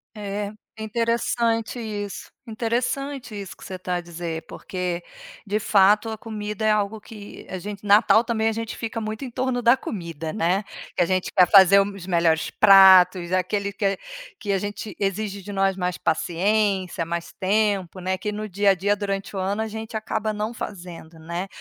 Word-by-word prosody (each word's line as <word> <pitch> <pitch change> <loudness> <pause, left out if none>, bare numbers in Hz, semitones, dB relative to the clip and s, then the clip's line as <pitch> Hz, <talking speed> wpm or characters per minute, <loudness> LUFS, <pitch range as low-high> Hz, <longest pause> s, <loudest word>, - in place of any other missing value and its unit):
É, 205 0 -4 0.2
é 220 - -6
interessante 230 +1 0
isso, 205 -3 -5 0.2
interessante 245 +3 -2
isso 200 -3 -7
que - - -12
você 185 -1 -7
tá 180 0 -2
a 175 - -2
dizer, 170 -1 -6
porque 180 -2 -4 0.4
de 210 +1 -1
fato 210 +1 +4
a 220 - -5
comida 210 -1 -5
é 215 - +3
algo 210 0 0
que 205 -1 -11
a 185 - -4
gente 200 +2 -7
natal 210 +2 +5
também 225 -2 0
a - - +2
gente 225 0 -5
fica 225 0 -4
muito 215 +4 -4
em 250 - -8
torno 255 0 -1
da 240 +1 +5
comida, 170 - -6
né. 190 +1 0 0.3
Que - - +1
a - - +5
gente 185 0 0
quer 180 -2 +6
fazer 195 -1 +8
os 195 -2 -5
melhores 170 -3 +1
pratos, 190 -3 +7
aquele 200 +2 0
que 195 -2 0 0.4
que 205 - -3
a 195 - +1
gente 205 +2 -6
exige 200 0 -2
de 205 +2 -8
nós 195 -1 +1
mais 180 -2 -2
paciência, 190 +2 0
mais 170 0 -4
tempo, 195 -2 0
né, 185 +1 -1
que 200 +3 -4
no 210 +1 -5
dia 200 +1 +2
a - - +2
dia 200 +3 +1
durante 200 0 -4
o - - -2
ano 200 +3 -1
a - - -4
gente 220 +1 -5
acaba 220 0 -2
não 215 +2 -3
fazendo, 175 -6 -8
né. 170 +4 -5
200 Hz, 185 wpm, -23 LUFS, 185-220 Hz, 0.4 s, fazer